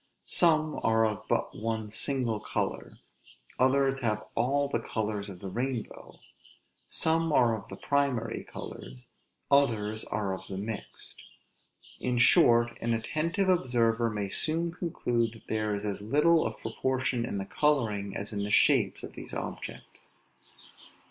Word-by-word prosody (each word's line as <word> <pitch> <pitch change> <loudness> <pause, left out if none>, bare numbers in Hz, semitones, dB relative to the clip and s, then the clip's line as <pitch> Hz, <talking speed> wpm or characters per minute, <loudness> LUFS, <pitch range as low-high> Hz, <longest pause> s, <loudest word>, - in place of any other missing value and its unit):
Some 155 -3 +2
are 115 0 +3
of 110 -2 -3
but - - 0
one 110 -1 -3
single 120 -1 0
color; - - -3 0.6
others 135 +1 +3
have 110 -4 -1
all 140 +5 +1
the - - -1
colors 105 -2 -3
of 90 -2 -10
the 100 - -5
rainbow; 120 +3 -4 0.7
some 165 0 +1
are 120 -5 +4
of 110 - -9
the - - -7
primary 135 -6 0
colors, 60 0 -9 0.4
others 110 -6 +2
are 100 -2 -2
of 95 - -8
the 95 - -5
mixed; 105 +2 -6 0.8
in 125 -1 -1
short, 120 -1 +5
an 115 0 +1
attentive 165 - -1
observer 120 -9 +2
may 105 -2 -3
soon 165 - 0
conclude 120 -10 -1
that 115 - -16
there 110 -1 0
is 100 +1 -4
as 100 -1 -2
little 150 +9 +3
of - - -7
proportion 130 -2 -1
in 100 - -3
the 95 - -3
coloring 105 -8 0
as 100 +2 -3
in 100 -1 -2
the 100 - -3
shapes - - +3
of - - -8
these - - -5
objects. - - -7
115 Hz, 145 wpm, -29 LUFS, 105-140 Hz, 0.8 s, short